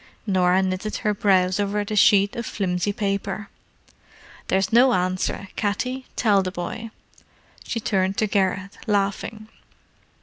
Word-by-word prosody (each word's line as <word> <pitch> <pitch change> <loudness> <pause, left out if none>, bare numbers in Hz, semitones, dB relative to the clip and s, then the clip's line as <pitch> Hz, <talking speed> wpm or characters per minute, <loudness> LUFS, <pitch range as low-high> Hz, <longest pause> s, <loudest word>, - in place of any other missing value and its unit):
Norah 185 -2 +3
knitted 190 +3 -2
her 210 - +3
brows 185 -2 +2
over 205 +1 0
the 215 - -4
sheet 200 0 +5
of 235 - -3
flimsy 185 -1 -1
paper. 200 0 -3 1.0
"There's 195 +3 0
no 250 +2 +6
answer, 185 +1 -1
Katty, 250 +5 -2
tell 205 -4 +3
the 185 - -2
boy." 195 +5 -5 0.8
She 230 - -3
turned 195 -3 0
to 215 - +2
Garrett, 195 -1 -1
laughing. 205 +1 -1
200 Hz, 130 wpm, -23 LUFS, 190-215 Hz, 1.0 s, no